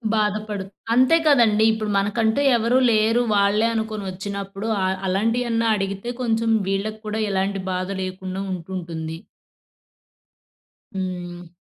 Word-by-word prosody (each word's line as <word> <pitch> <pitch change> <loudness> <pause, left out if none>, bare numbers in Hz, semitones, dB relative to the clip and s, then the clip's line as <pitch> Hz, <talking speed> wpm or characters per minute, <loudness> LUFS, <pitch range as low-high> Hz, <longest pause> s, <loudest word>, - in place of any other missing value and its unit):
బాధపడు 210 -1 -1 0.3
అంతే 260 +7 +5
కదండీ. 225 -7 +5
ఇప్పుడు 220 -1 -2
మనకంటూ 220 +5 +1 0.2
ఎవరూ 230 +3 +2
లేరు, 220 +2 +3
వాళ్ళే 205 +2 +3
అనుకొనొచ్చినప్పుడు, 200 -1 -4 0.2
అ - - +2 0.2
అలాంటియన్నా 230 +4 +1
అడిగితే 195 +4 -3
కొంచం 225 -1 +1 0.2
వీళ్ళకు 210 +3 -2
కూడా 215 +1 -2
ఎలాంటి 195 0 -1
బాధ 185 +1 -2
లేకుండా 185 0 -5
ఉంటుంటుంది. 165 -3 -5 1.8
హ్మ్. 180 -2 -5
205 Hz, 105 wpm, -22 LUFS, 190-225 Hz, 1.8 s, అంతే